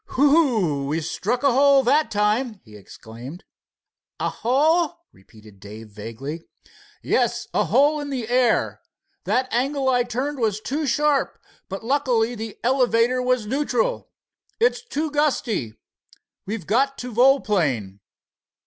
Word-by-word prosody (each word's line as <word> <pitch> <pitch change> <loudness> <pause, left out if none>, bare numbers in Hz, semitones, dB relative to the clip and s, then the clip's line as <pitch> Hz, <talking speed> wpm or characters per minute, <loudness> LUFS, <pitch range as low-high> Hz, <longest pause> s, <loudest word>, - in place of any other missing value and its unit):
"Whew! 250 - +3
we 155 +3 -1
struck 215 - -2
a 280 - +4
hole 275 +1 +5
that 290 +5 +2
time," 210 +2 0
he 110 -3 -16
exclaimed. 120 - -11 0.8
"A - - 0
hole?" 310 +7 +1
repeated 105 +1 -18
Dave 105 +2 -11
vaguely. 115 +10 -7 0.6
"Yes, - - 0
a - - +2
hole 295 +2 +3
in 290 -1 -5
the 250 -5 -4
air. 245 -1 +1 0.4
That 255 +1 +1
angle 265 +2 0
I 250 -1 +3
turned 255 +4 -3
was 215 -3 0
too 280 +7 -3
sharp, 295 +1 +1 0.3
but 195 +3 -6
luckily 245 -3 +1
the 220 -2 -7
elevator 250 -1 +2
was 250 -3 0
neutral. 295 - -1 0.5
It's 470 +1 +2
too 315 -8 -3
gusty. 245 - -1 0.7
We've 205 -4 -4
got 275 - +1
to 250 -1 -7
volplane." 180 - +2
245 Hz, 130 wpm, -22 LUFS, 190-280 Hz, 0.8 s, hole